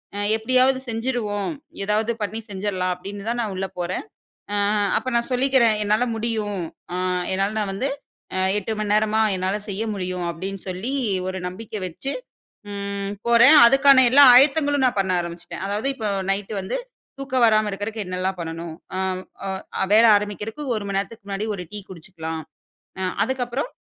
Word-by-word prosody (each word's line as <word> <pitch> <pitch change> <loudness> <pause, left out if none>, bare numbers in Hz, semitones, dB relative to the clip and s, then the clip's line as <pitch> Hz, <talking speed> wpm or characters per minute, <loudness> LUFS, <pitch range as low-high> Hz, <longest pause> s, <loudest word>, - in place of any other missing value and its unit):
அ - - -4 0.2
எப்டியாவது 255 +3 +3
செஞ்சிருவோம். 225 -1 -2 0.3
ஏதாவது 215 +2 +1
பண்ணி 220 +2 -3
செஞ்சிரலாம் 190 -2 -1
அப்டின்னுதான் 205 +6 -5
நான் 205 -3 -3
உள்ள 195 0 -2
போறன். 175 - -3 0.5
அ - - +1 0.4
அப்ப - - -7
நான் 235 - 0
சொல்லிக்கிறன். 250 -4 +3
"என்னால 215 +4 +2
முடியும். 215 -4 -2 0.3
அ - - -1 0.4
என்னால 195 +1 +1
நான் 200 -2 -2
வந்து 260 +8 -1 0.5
அ - - +1 0.2
8 210 +2 -3
மணி 210 -1 -1
நேரமா 215 +1 +2 0.2
என்னால 185 +2 -1
செய்ய 200 +3 -3
முடியும்." 180 -2 -3
அப்டின்னு 190 +3 -6
சொல்லி 185 +9 -3 0.4
ஒரு 185 0 -3
நம்பிக்க 210 +4 -10
வச்சு 225 +11 -5 0.6
ம் 200 0 -4
போறன். 235 +6 +7
அதுக்கான 270 +1 +6
எல்லா 285 +2 +7
ஆயத்தங்களும் 285 +1 +4
நான் 240 -5 0
பண்ண 190 -1 -1
ஆரம்பிச்சிட்டன். 170 +2 -6
அதாவது 210 +6 -1
இப்ப 220 -5 -4 0.2
நைட்டு 200 +2 -2
வந்து 190 - -3 0.4
தூக்கம் 260 -3 +1
வராம 215 -1 +3
இருக்கறதுக்கு 205 +2 -4
என்னெல்லாம் 185 +1 -2
பண்ணணும், 165 0 -5 0.3
ஆம். 190 -1 -1 0.3
அ 190 0 -4
வேல 220 +2 +7
ஆரம்பிக்கறதுக்கு 210 +6 -4
1 205 - -4
மணி 200 -1 -2
நேரத்துக்கு 205 0 -6
முன்னாடி 200 +1 -3
1 180 - -5
டீ 210 - -4
குடிச்சுக்கலாம். 160 -2 -6 0.6
அ 190 - -2 0.2
அதுக்கப்புறம் 260 - -2
205 Hz, 155 wpm, -23 LUFS, 190-235 Hz, 0.6 s, போறன்